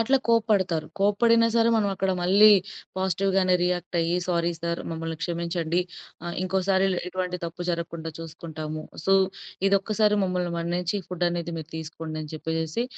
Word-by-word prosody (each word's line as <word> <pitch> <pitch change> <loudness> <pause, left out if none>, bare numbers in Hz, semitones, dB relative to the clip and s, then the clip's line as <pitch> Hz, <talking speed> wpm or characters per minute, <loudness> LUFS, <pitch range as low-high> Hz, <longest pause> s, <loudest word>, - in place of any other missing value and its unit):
అట్లా 260 +4 +4
కోప్పడతారు. 200 -9 +2
కోప్పడిన 230 +3 +4
సరే. 230 0 +4
మనమక్కడ 195 -2 0
మళ్ళీ 200 +4 +7 0.5
పాజిటివ్‌గానే 190 0 +2
రియాక్ట్ 180 0 -1
అయ్యి 170 +2 +1
సారీ 170 -1 +1
సార్ 170 0 -2
మమ్మల్ని 165 0 -4
క్షమించండి. 170 0 -1 0.4
ఆహ్, 175 - -4
ఇంకోసారి 190 +1 +1
ఇల్ 185 - 0
ఇటువంటి 180 0 -3
తప్పు 170 +1 -5
జరగకుండా 170 -1 -4
చూసుకుంటాము. 155 -1 -6 0.2
సో, 195 - +4 0.5
ఇదొక్కసారి 210 +1 +2
మమ్మల్ని 180 -2 -1
మన్నించి 175 +3 -1
ఫుడ్ 180 -1 -2
అనేది 170 -1 -3
మీరు 160 0 -7
తీసుకోండి 160 0 -6
అని 150 - -8
చెప్పేసేసి. 160 +7 -2
180 Hz, 140 wpm, -26 LUFS, 165-195 Hz, 0.5 s, మళ్ళీ